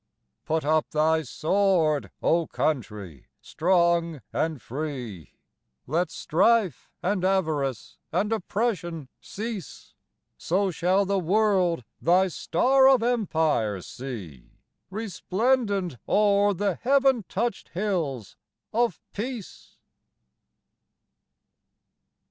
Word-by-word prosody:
Put 160 -1 -1
up 155 0 +2
thy 160 +1 +2
sword, 165 -2 +1
O 165 -1 +2
Country, 105 - -3
strong 170 - +1
and 160 -3 -1
free, 125 - -6 0.5
Let 170 +6 0
strife 190 - +1
and 185 0 0
avarice 155 - -1
and 200 +6 0
oppression 180 - -2
cease; 215 -2 -7 0.5
So 190 +3 0
shall 185 +4 +2
the 200 0 +1
world 185 - +2 0.2
thy 185 +3 +4
Star 265 - +3
of 260 -4 +4
Empire 160 - +1
see 95 - -8 0.4
Resplendent 200 - -1
o'er 205 -1 +3
the 200 +1 0
heaven 270 -2 +3
touched 230 +2 -2
hills 170 - -3 0.4
of 230 -4 +1
Peace. 230 -1 -7
180 Hz, 90 wpm, -26 LUFS, 155-205 Hz, 0.5 s, thy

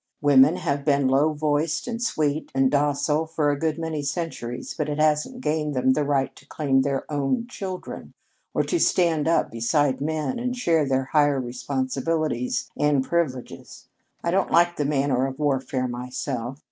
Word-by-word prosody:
Women 145 +1 +5
have 140 0 -2
been 140 -2 +2
low 140 +4 +3
voiced 150 +3 0
and 235 -1 -4
sweet 155 -9 -1
and 135 -1 +3
docile 145 +2 +1
for 155 -2 +1
a 145 - -2
good 160 0 0
many 160 -2 -3
centuries, 140 -5 -4
but - - -2
it 145 - -2
hasn't 155 +11 +1
gained 150 - -1
them 130 +1 +3
the 150 - 0
right 140 -2 0
to - - -17
claim 135 -3 +1
their 135 0 -1
own 145 - 0
children, 195 -6 -7 0.4
or - - +1
to 345 - -1
stand 165 - +2
up 165 - +2
beside 130 +4 +1
men 155 - -2
and 250 +1 -2
share 165 - +2
their 135 0 +1
higher 145 0 +2
responsibilities 130 +2 -2
and 145 -2 +2
privileges. 135 -5 -3 0.3
I 170 - 0
don't 190 +1 +1
like 175 0 +4
the 145 - 0
manner 135 -2 +1
of 135 0 -7
warfare, 135 -3 0
myself. 125 +1 -4
145 Hz, 170 wpm, -24 LUFS, 135-160 Hz, 0.4 s, Women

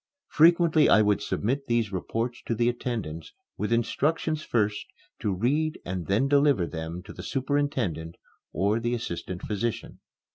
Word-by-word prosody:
Frequently 165 -1 +5
I 110 - +6
would 105 0 +2
submit 130 +7 -2
these 115 -3 +1
reports 115 +6 -3
to 115 - 0
the 120 +2 +1
attendants 115 -10 -4 0.2
with 105 +3 -3
instructions 150 +7 0
first 105 -6 -1 0.3
to 105 -7 -1
read 140 +11 0
and 90 -2 -4
then 105 +8 +2
deliver 140 -8 +3
them 85 +1 -6
to - - -10
the - - -8
superintendent 130 - -1 0.4
or 100 +7 +1
the 120 +1 -1
assistant 90 -5 -5
physician. 110 +2 -3
115 Hz, 145 wpm, -27 LUFS, 95-140 Hz, 0.4 s, I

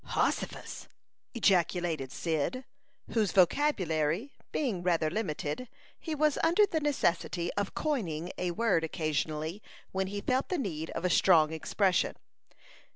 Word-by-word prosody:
"Hossifus!" - - -2 0.5
ejaculated 175 - +1
Cyd, 165 - -2 0.5
whose 215 -6 +1
vocabulary 185 - +2 0.2
being 230 -12 -1
rather 165 -3 +1
limited, 190 +2 -3 0.3
he 320 -2 -4
was 300 0 +2
under 345 +6 +5
the 325 -5 -1
necessity 175 - 0
of 205 -1 -2
coining 180 - -2
a 180 - 0
word 185 -2 +1
occasionally, 155 +3 -2 0.3
when 190 0 -1
he 205 +1 -4
felt 255 +6 0
the 365 - 0
need 165 - -3
of 180 - -3
a - - +3
strong 160 -4 +5
expression. 185 +3 +1
180 Hz, 125 wpm, -30 LUFS, 160-240 Hz, 0.5 s, under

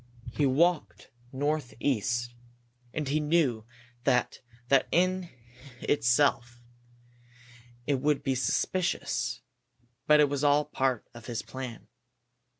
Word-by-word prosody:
He 145 +3 +1
walked 145 - +1 0.2
northeast, 125 -4 -1 0.6
and 150 +1 -3
he 145 +3 +1
knew 150 -8 +1 0.4
that 125 0 +1 0.3
that 135 -2 +4
in 185 0 +1 0.5
itself 120 -2 +1 1.3
would 145 +1 +1
be 135 - +1
suspicious, 150 +8 -1 0.7
but 150 0 +6
it 150 - +6
was 140 0 -2
all 145 +1 +4
part 130 -5 -1
of 120 -2 -12
his 120 -1 -3
plan. 130 -4 -8
135 Hz, 100 wpm, -28 LUFS, 120-150 Hz, 1.3 s, but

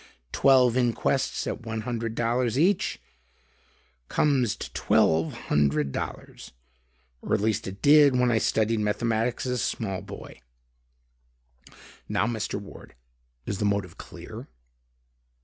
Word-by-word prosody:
Twelve 130 -3 +4
inquests 130 +2 0
at - - -4
one 110 -1 -4
hundred 115 -1 -4 0.4
each, 180 +6 +1 1.1
comes 130 -7 +1
to - - -8
twelve 80 0 +2
hundred 75 -1 0
dollars; - - -7 0.7
or - - 0
at - - 0
least 110 -1 0
it 95 +1 -8
did 145 -2 +6
when 125 -1 +3
I 110 - +2
studied 110 +1 +1
mathematics 115 +3 -1
as 125 - -1
a 125 - -1
small 95 -3 -2
boy. 100 -9 -11 1.7
Now, - - +1
Mr. 115 -3 -3
Ward, 100 -9 -13 0.5
is 100 - -4
the 105 - 0
motive 100 -4 -1
clear?" - - -10
110 Hz, 120 wpm, -26 LUFS, 100-125 Hz, 1.7 s, did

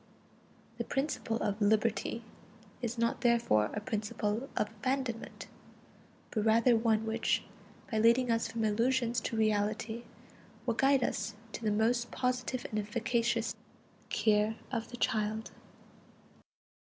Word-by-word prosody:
The - - +1
principle 270 -5 -1
of 205 +1 -1
liberty 220 +2 +1 0.6
is 240 0 -3
not 230 0 0
therefore 235 - +3
a - - -3
principle 210 +2 -2
of 210 - +2
abandonment, 245 +1 -3 0.9
but 215 - 0
rather 230 +2 +5
one 225 -1 +2
which, 220 0 +1 0.5
by 220 - +1
leading 235 +2 +4
us 230 0 +1
from 225 -1 -2
illusions 235 +2 +1
to 225 - -3
reality, 215 +2 0 0.6
will 235 - +1
guide 270 +2 +3
us 225 - -2 0.2
to - - -6
the 215 - +2
most 235 +3 +2
positive 250 0 -1
and 215 - 0
efficacious 230 +2 0 0.6
"care 215 0 +2 0.2
of 230 -3 -2
the 245 - -8
child." 215 -1 0
230 Hz, 125 wpm, -32 LUFS, 215-240 Hz, 0.9 s, rather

